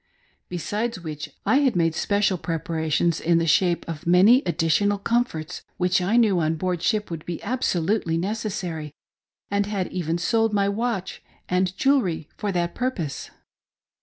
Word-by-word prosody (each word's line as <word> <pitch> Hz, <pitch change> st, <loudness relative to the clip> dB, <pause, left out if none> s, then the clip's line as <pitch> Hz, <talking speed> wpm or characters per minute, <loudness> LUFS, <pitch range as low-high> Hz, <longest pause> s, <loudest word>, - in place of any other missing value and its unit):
Besides 210 Hz, +5 st, -3 dB
which 155 Hz, -3 st, -6 dB, 0.2 s
I 265 Hz, -, +4 dB
had 275 Hz, -6 st, +2 dB
made 165 Hz, -2 st, +2 dB
special 200 Hz, +1 st, +1 dB
preparations 160 Hz, 0 st, -1 dB
in 170 Hz, 0 st, +3 dB
the 165 Hz, -, +1 dB
shape 170 Hz, +2 st, +2 dB
of 165 Hz, -1 st, -6 dB
many 195 Hz, +9 st, +6 dB
additional 175 Hz, +5 st, +2 dB
comforts 200 Hz, -7 st, -1 dB, 0.2 s
which 180 Hz, 0 st, +2 dB
I 200 Hz, +6 st, +2 dB
knew 210 Hz, -6 st, +4 dB
on 160 Hz, 0 st, +1 dB
board 180 Hz, +1 st, -2 dB
ship 210 Hz, 0 st, 0 dB
would 160 Hz, -2 st, -5 dB
be 175 Hz, -2 st, -5 dB
absolutely 200 Hz, -7 st, 0 dB
necessary, 175 Hz, -6 st, -3 dB, 0.6 s
and 200 Hz, 0 st, +1 dB
had 200 Hz, -3 st, -2 dB
even 170 Hz, -2 st, -1 dB
sold 225 Hz, +4 st, +1 dB
my 200 Hz, -1 st, +2 dB
watch 200 Hz, -2 st, -2 dB, 0.3 s
and 185 Hz, +1 st, +2 dB
jewelr)f 240 Hz, -, +2 dB
for 205 Hz, -, -2 dB
that 175 Hz, -2 st, -1 dB
purpose. 195 Hz, -, -3 dB
180 Hz, 150 wpm, -24 LUFS, 165-210 Hz, 0.6 s, many